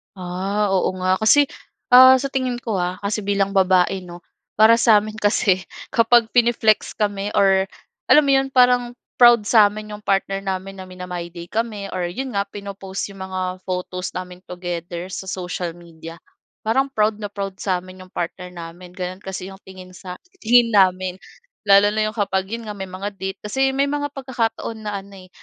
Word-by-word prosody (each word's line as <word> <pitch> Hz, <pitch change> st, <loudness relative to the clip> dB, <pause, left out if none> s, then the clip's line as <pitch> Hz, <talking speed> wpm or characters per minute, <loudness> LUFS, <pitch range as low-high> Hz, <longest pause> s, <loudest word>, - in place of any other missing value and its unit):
Ah, 190 Hz, +3 st, -2 dB
oo 190 Hz, 0 st, +1 dB
nga. 185 Hz, 0 st, +2 dB
Kasi, 220 Hz, +7 st, +5 dB, 0.5 s
ah, 260 Hz, +1 st, +9 dB
sa 275 Hz, +2 st, -2 dB
tingin 255 Hz, -2 st, -1 dB
ko 220 Hz, -5 st, -2 dB
ah, 180 Hz, +1 st, -1 dB
kasi 205 Hz, +2 st, -1 dB
bilang 200 Hz, -1 st, +1 dB
babae 190 Hz, -1 st, +3 dB
'no. 175 Hz, 0 st, -11 dB, 0.3 s
Para 220 Hz, +2 st, +6 dB
sa 225 Hz, -2 st, +6 dB
amin 215 Hz, +1 st, -8 dB
kasi, 205 Hz, -2 st, +2 dB, 0.3 s
kapag 230 Hz, 0 st, +4 dB
pine-flex 235 Hz, -3 st, +2 dB
kami 205 Hz, -1 st, -1 dB
or 195 Hz, -1 st, +4 dB, 0.4 s
alam 300 Hz, -, +6 dB
mo 280 Hz, -, +2 dB
'yon, 270 Hz, 0 st, +3 dB
parang 245 Hz, -1 st, +3 dB, 0.2 s
proud 240 Hz, -3 st, +7 dB
sa 220 Hz, -3 st, +7 dB
amin 210 Hz, +1 st, -8 dB
'yong 210 Hz, 0 st, -10 dB
partner 195 Hz, 0 st, 0 dB
namin 195 Hz, 0 st, -4 dB
na 185 Hz, -, -8 dB
mina-MyDay 175 Hz, -2 st, -8 dB
kami 215 Hz, -3 st, -3 dB
or 180 Hz, -1 st, -2 dB
'yon 255 Hz, +8 st, -5 dB
nga 200 Hz, -, +1 dB
pino-post 200 Hz, -1 st, -7 dB
'yong 195 Hz, -1 st, -11 dB
mga 185 Hz, 0 st, -4 dB, 0.2 s
photos 180 Hz, 0 st, -4 dB
namin 180 Hz, 0 st, -7 dB
together 175 Hz, 0 st, -6 dB
sa 190 Hz, -, -6 dB
social 180 Hz, -2 st, -4 dB
media, 165 Hz, -1 st, -12 dB, 0.5 s
parang 265 Hz, +5 st, +2 dB
proud 215 Hz, 0 st, +1 dB
na 210 Hz, -1 st, -5 dB
proud 195 Hz, -1 st, -5 dB
sa 185 Hz, -3 st, -1 dB
amin 185 Hz, 0 st, -13 dB
'yong 185 Hz, -, -24 dB
partner 180 Hz, +1 st, -5 dB
namin. 175 Hz, +1 st, -10 dB
Gano'n 185 Hz, +1 st, -6 dB
kasi 190 Hz, 0 st, -6 dB
'yong 195 Hz, 0 st, -12 dB
tingin 185 Hz, -1 st, -12 dB
sa 180 Hz, 0 st, -9 dB, 0.3 s
tingin 235 Hz, +1 st, +5 dB
namin. 185 Hz, -2 st, +3 dB, 0.5 s
Lalo 200 Hz, +1 st, +6 dB
na 215 Hz, 0 st, 0 dB
'yong 215 Hz, -, -6 dB
kapag 190 Hz, -2 st, 0 dB
'yon 230 Hz, +1 st, -5 dB
nga, 210 Hz, -, -5 dB
may 190 Hz, -1 st, -5 dB
mga 190 Hz, +3 st, -5 dB
date. 190 Hz, 0 st, -5 dB
Kasi 265 Hz, +6 st, +1 dB
may 275 Hz, +1 st, +2 dB
mga 290 Hz, 0 st, -1 dB
pagkakataon 230 Hz, -4 st, -3 dB
na 205 Hz, -, -3 dB
ano 200 Hz, +1 st, -16 dB
eh, -, -, -33 dB
195 Hz, 185 wpm, -21 LUFS, 185-220 Hz, 0.5 s, ah